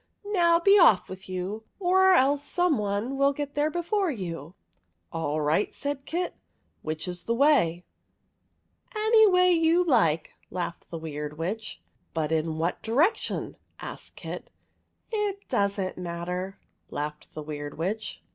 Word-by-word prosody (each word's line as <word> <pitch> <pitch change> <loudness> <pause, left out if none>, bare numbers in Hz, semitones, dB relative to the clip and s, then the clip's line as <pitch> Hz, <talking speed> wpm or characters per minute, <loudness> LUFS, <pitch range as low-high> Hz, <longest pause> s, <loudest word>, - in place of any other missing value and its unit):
Now, 345 -5 +3
be 395 +4 +6
off 200 - +6
with 190 0 -9
you, 185 +4 -4 0.2
or 380 0 +5
else 280 -1 +3
someone 260 - 0
will 275 +1 +3
get 285 0 -4
there 295 +1 +1
before 350 +4 0
you! 170 - -5 0.2
" 85 +1 -42
" 85 +1 -48
All 155 -2 -1
right," 155 +7 +1
said 285 -1 -4
Kit. 350 +2 -2 0.3
" - - -44
Which 155 +2 -4
is 180 -1 -3
the 230 - 0
way? 235 - +3 0.6
" - - -32
"Any 440 -1 +7
way 365 -1 +5
you 335 +1 +4
like," 185 - +2 0.2
laughed 175 -1 -5
the 165 - -5
Weird 150 -2 -6
Witch.' 200 +7 -4
" - - -44
But 160 -1 -1
in 160 0 0
what 165 +2 -1
direction? 295 - 0
" - - -44
asked - - -7
Kit. - - -7 0.4
" - - -42 0.2
It 410 -2 -2
does 200 -4 +1
n't 185 -1 -3
matter," 180 +2 -4 0.3
laughed 150 +1 -6
the 155 - -5
Weird 145 -1 -6
Witch. 200 +7 -3
205 Hz, 165 wpm, -27 LUFS, -, 0.6 s, Any